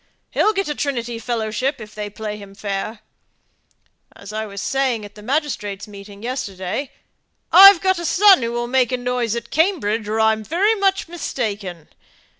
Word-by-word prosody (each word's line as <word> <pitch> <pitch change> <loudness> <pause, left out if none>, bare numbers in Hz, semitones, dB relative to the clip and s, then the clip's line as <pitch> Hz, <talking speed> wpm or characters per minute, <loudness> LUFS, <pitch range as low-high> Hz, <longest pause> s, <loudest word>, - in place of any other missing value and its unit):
He'll 430 - +3
get 390 -1 -1
a 295 - -1
Trinity 240 -5 -3
fellowship, 230 +3 -2
if 215 -1 -10
they 210 -1 -5
play 210 0 -6
him 200 -1 -12
fair. 200 +2 -4 1.1
As 200 +1 -11
I 220 0 -3
was 200 -1 -8
saying 260 -3 -1
at 205 - -12
the 210 - -13
magistrates' 215 -6 -2
meeting 200 0 -12
yesterday, 235 0 -4 0.6
'I've 390 -1 +10
got 375 -2 +1
a 345 - -4
son 390 -1 +6
who 230 0 -2
will 240 0 -2
make 250 0 +1
a 255 - 0
noise 245 -2 -1
at 235 - -6
Cambridge, 255 - +1
or 220 +1 -1
I'm 220 0 +2
very 370 - +2
much 390 -3 0
mistaken.' 205 - -4
230 Hz, 170 wpm, -20 LUFS, 210-285 Hz, 1.1 s, I've